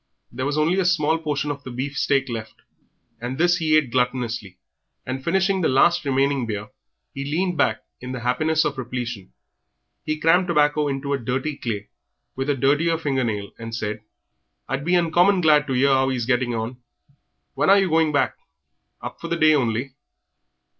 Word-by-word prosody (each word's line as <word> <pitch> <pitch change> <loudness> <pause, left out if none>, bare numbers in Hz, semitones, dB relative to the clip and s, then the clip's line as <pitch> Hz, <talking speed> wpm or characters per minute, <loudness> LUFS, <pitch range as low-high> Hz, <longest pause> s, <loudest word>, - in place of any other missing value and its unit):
There 130 +3 -3
was 145 +1 -1
only 165 +5 +2
a 190 - +1
small 165 -2 +2
portion 150 -2 -2
of 140 0 -7
the - - -8
beef 130 +3 -4
steak 140 -1 +1
left, 115 -3 -6 0.6
and 125 +2 -5
this 175 +2 +3
he 155 -2 +3
ate 145 -6 0
gluttonously, 120 -6 -1 0.5
and, 130 +1 -4
finishing 190 +3 +1
the 160 - +2
last 170 +5 +3
remaining 135 -2 +1
beer, 105 +1 -4 0.4
he 140 - -5
leaned 175 +6 -1
back - - +1 0.2
in 125 - -7
the 125 -2 -5
happiness 155 +6 +1
of 140 -2 -2
repletion. 120 - -5 0.7
He 155 0 -2
crammed 175 +3 +3
tobacco 150 -2 +2
into 140 0 -2
a 140 - -1
dirty 130 +5 -2
clay, 105 -6 -5 0.5
with 135 +2 -3
a 145 - +2
dirtier 145 +6 +2
finger 135 -5 -1
nail, 105 -4 -3
and 115 0 -6
said 110 -1 -3 0.7
"I'd 135 +1 -3
be 180 +1 +2
uncommon 175 +3 +3
glad 150 -2 +4
to 135 - -1
'ear 135 +2 +3
how 135 0 +3
he 130 - -1
is 120 - -2
getting 125 -1 0
on. 115 +3 -4 0.8
When - - +1
are 200 - +7
you 195 -1 +3
going 160 -2 +2
back? 140 -3 +1 0.7
Up - - -7
for - - -5
the 170 - -1
day 155 -1 +5
only?" 125 -1 0
140 Hz, 190 wpm, -23 LUFS, 125-160 Hz, 0.8 s, are